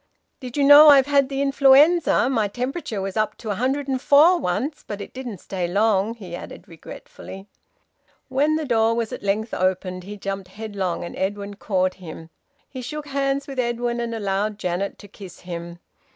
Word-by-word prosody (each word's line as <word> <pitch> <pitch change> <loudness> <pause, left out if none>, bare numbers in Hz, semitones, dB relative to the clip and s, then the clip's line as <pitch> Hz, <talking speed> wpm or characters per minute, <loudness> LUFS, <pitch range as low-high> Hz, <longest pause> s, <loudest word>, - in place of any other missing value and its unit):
"Did 250 0 -8
you 285 - +2
know 290 +2 +9
I've 275 -2 +7
had 280 -1 +2
the 275 0 -1
influenza? 280 +3 +4
My 225 -6 +1
temperature 250 - -4
was 195 -1 -5
up 215 -1 -1
to 220 - -8
104 275 - +3
once 280 - -3
but 205 - -6
it 200 - -9
didn't 250 -5 -7
stay 180 0 -4
long," 205 +3 +1
he 185 -6 -9
added - - -10
regretfully. 190 +3 -11 0.8
When 285 +4 +1
the 315 -1 -2
door 230 -3 +2
was 230 -1 -3
at - - -6
length 210 +3 -2
opened, 185 0 -1
he 205 +3 -8
jumped 195 -1 -5
headlong, 195 -3 -4
and 170 - -7
Edwin 200 +1 -3
caught 185 -2 -1
him. 165 -1 -10 0.4
He 260 - -8
shook 295 +4 -7
hands 275 0 -1
with 275 -2 -7
Edwin 240 0 -1
and 235 -1 -3
allowed 205 0 -2
Janet 180 +1 -3
to 205 - -13
kiss 195 -2 -13
him. 170 -1 -7
225 Hz, 175 wpm, -22 LUFS, 195-275 Hz, 0.8 s, know